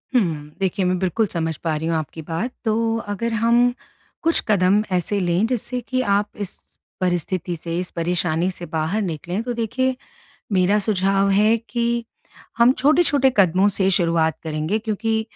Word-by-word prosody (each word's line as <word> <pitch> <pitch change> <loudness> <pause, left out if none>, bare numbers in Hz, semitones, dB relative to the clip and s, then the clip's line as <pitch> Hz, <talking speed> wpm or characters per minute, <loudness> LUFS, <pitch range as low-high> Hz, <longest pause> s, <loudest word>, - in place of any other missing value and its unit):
हुँ, 155 -10 0
देखिए 190 0 0
मैं 180 0 +1
बिल्कुल 190 +4 +1
समझ 165 -3 -2
पा 160 -2 0
रही 160 +2 -3
हूँ 165 - 0
आपकी 155 +1 -5
बात, 165 +10 -3
तो 225 +1 +1
अगर 215 +3 -2
हम 240 +1 +4 0.5
कुछ 330 0 +4
कदम 200 0 +3
ऐसे 200 +3 -1
लें 180 +2 +1
जिससे 250 +1 -2
कि 255 0 +1
आप 205 -3 +1 0.2
इस - - -11 0.4
परिस्थिति 175 0 -1
से, 165 +1 -5
इस 180 - -4
परेशानी 170 0 0
से 175 -1 -6
बाहर 165 +6 -1
निकलें 180 +1 -3
तो 245 - -3
देखिए 255 +3 -1 0.6
मेरा 195 +2 +3
सुझाव 195 -1 +1
है 210 +3 +4
कि 235 +1 -2 0.5
हम 235 +1 +6
छोटे-छोटे 285 -1 +3
कदमों 190 +1 +4
से 190 -1 +1
शुरुआत 165 -3 +1
करेंगे 155 +7 -1
क्योंकि 220 0 -1
195 Hz, 160 wpm, -22 LUFS, 170-225 Hz, 0.6 s, हम